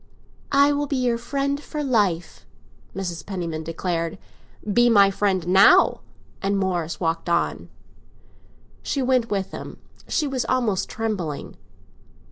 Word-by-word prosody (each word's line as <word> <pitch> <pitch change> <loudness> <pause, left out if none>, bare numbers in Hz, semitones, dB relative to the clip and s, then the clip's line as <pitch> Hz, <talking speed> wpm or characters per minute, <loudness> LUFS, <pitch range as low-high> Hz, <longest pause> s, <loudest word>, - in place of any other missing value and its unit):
"I 280 +1 +5
will 290 0 -1
be 280 - -2
your 245 -2 0
friend 280 +3 -2
for 300 0 -5
life!" 205 - 0 0.5
Mrs. 175 -3 -4
Penniman 170 -5 -4
declared. 165 +1 -3 0.6
"Be 240 +2 +5
my 200 -3 +6
friend 190 -3 0
now!" 190 +2 +6 0.4
And 200 +1 0
Morris 175 -4 -2
walked 165 0 -1
on. 170 0 -1 1.1
She 275 - -2
went 250 -2 +1
with 195 -2 -2
him; - - -8 0.3
she 305 - 0
was 265 -3 -1
almost 235 -7 0
trembling. 200 -10 -4
200 Hz, 125 wpm, -23 LUFS, 175-255 Hz, 1.1 s, my